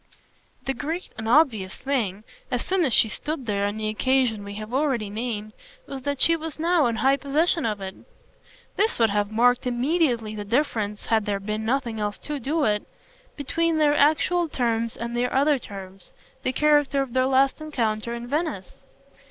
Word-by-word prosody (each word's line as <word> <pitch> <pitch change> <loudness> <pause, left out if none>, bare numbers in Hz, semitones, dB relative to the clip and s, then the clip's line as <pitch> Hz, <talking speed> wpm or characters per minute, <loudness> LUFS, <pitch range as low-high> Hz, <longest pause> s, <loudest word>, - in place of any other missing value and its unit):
The 270 - 0
great 320 +7 -4
and 220 0 -4
obvious 230 -9 +3
thing, 220 -8 -2 0.3
as 245 -2 -2
soon 370 -2 +2
as 265 - 0
she 225 - +5
stood 290 +5 -4
there 200 -2 0
on 205 +1 -4
the 215 0 -2
occasion 235 -1 +1
we 200 0 -7
have 215 +2 -7
already 260 -7 0
named, 215 -1 -4 0.3
was 275 -1 -6
that 285 0 -2
she 330 - +5
was 325 -1 -6
now 330 -3 +3
in 230 - -1
high 270 +4 +3
possession 300 +1 +1
of 210 -2 -2
it. 190 0 -5 0.8
This 430 +3 +2
would 225 -3 +3
have 205 0 0
marked 245 +3 +3
immediately 245 -3 +1
the 210 -1 -5
difference 215 -3 -1
had 220 -2 +1
there 200 -1 0
been 215 +2 -3
nothing 235 -2 -1
else 205 -1 -2
to 300 -1 -5
do 295 +5 0
it 210 -4 +2 0.5
between 330 +3 0
their 295 -1 +4
actual 315 +4 +3
terms 230 -3 -1
and 235 +1 -4
their 245 +1 0
other 280 +1 +3
terms, 195 -4 -10 0.3
the 255 - 0
character 290 -1 +3
of 255 -3 -9
their 260 0 +3
last 270 +2 +2
encounter 235 -7 -2
in 235 0 -7
Venice. 285 - -3
245 Hz, 185 wpm, -25 LUFS, 215-290 Hz, 0.8 s, she